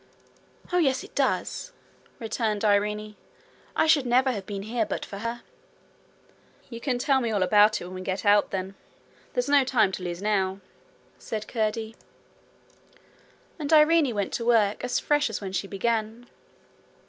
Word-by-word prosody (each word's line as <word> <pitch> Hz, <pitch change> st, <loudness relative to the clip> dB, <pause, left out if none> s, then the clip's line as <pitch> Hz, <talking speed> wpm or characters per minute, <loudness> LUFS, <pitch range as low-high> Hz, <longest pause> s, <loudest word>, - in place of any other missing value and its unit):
'Oh, 360 Hz, -, +4 dB
yes, 270 Hz, -6 st, +1 dB
it -, -, -14 dB
does!' -, -, -1 dB, 0.4 s
returned 220 Hz, -2 st, -2 dB
Irene. 210 Hz, +1 st, +1 dB, 0.6 s
'I -, -, +3 dB
should 305 Hz, -5 st, +3 dB
never 255 Hz, +2 st, +3 dB
have 200 Hz, -5 st, -6 dB
been 200 Hz, -1 st, -5 dB
here 225 Hz, +2 st, -1 dB
but 210 Hz, -, -4 dB
for 200 Hz, -, -8 dB
her.' 230 Hz, +2 st, -4 dB, 1.3 s
'You 230 Hz, 0 st, -7 dB
can 255 Hz, -2 st, -1 dB
tell 270 Hz, +1 st, +2 dB
me 235 Hz, -, -1 dB
all 205 Hz, -4 st, +1 dB
about 210 Hz, +3 st, +4 dB
it -, -, -8 dB
when 180 Hz, -, -9 dB
we 185 Hz, -, -6 dB
get 190 Hz, +2 st, -4 dB
out, 205 Hz, 0 st, +4 dB
then. 190 Hz, 0 st, -4 dB, 0.6 s
There's -, -, -1 dB
no 285 Hz, -1 st, +5 dB
time 235 Hz, -6 st, +2 dB
to 185 Hz, -, -6 dB
lose 175 Hz, -1 st, -4 dB
now,'said 200 Hz, +2 st, -4 dB
Curdie. 220 Hz, 0 st, -2 dB, 1.6 s
And 295 Hz, -1 st, -3 dB
Irene 305 Hz, -4 st, +5 dB
went 200 Hz, -1 st, -2 dB
to 235 Hz, -, -2 dB
work, 220 Hz, -3 st, +2 dB
as 250 Hz, -, 0 dB
fresh 295 Hz, -3 st, +1 dB
as 220 Hz, -, -4 dB
when 195 Hz, -2 st, -6 dB
she 195 Hz, +1 st, -2 dB
began. 225 Hz, +3 st, -2 dB
220 Hz, 160 wpm, -26 LUFS, 200-250 Hz, 1.6 s, no